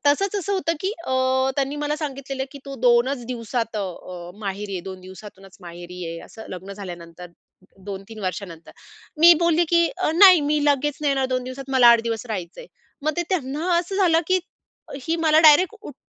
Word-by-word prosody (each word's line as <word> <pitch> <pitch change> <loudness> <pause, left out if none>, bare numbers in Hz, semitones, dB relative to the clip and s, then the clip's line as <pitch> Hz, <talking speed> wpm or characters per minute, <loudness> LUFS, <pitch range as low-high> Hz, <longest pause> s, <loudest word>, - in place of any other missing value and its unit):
तसंच 390 +8 +2
असं 400 0 -2
होतं 330 -4 0
की 380 +2 -1
अ, 260 - -2 0.4
त्यांनी 275 +1 -1
मला 295 0 -2
सांगितलेलं 275 -3 -4
की 280 - -9
तू 275 -1 -7
2 240 0 +4
च 245 -4 -10
दिवसात 230 -2 -3
अ, 180 -3 -6
माहेरी 200 0 -4
ये 180 - -3
2 185 - -9
दिवसातूनच 190 +1 -13
माहेरी 175 0 -10
ये 165 0 -5
असं 220 - -12
लग्न 185 +2 -8
झाल्यानंतर 175 -3 -9 0.6
2-3 200 +2 -8
वर्षानंतर. 185 -3 -6 0.5
मी 340 +1 +9
बोलली 340 0 +3
की 340 -1 +4
अ, 370 - 0
नाही 365 -2 +8
मी 300 -1 +1
लगेच 290 0 +1
नाही 295 -1 +1
येणार 270 -1 +1
2 255 - -2
दिवसात 265 +1 -8
मला 250 -2 +6
8 235 -1 +7
दिवस 230 0 -3
राहायचं 190 -6 -6
आहे. - - -11 0.4
मग 310 +1 0
ते 345 - +1
त्यांना 330 0 -1
असं 360 +3 -3
झालं 340 -4 +4
की 370 +1 +3 0.7
ही 330 - 0
मला 315 -2 +3
डायरेक्ट 325 +7 +6
उट 290 - -10
260 Hz, 190 wpm, -23 LUFS, 195-315 Hz, 0.7 s, मी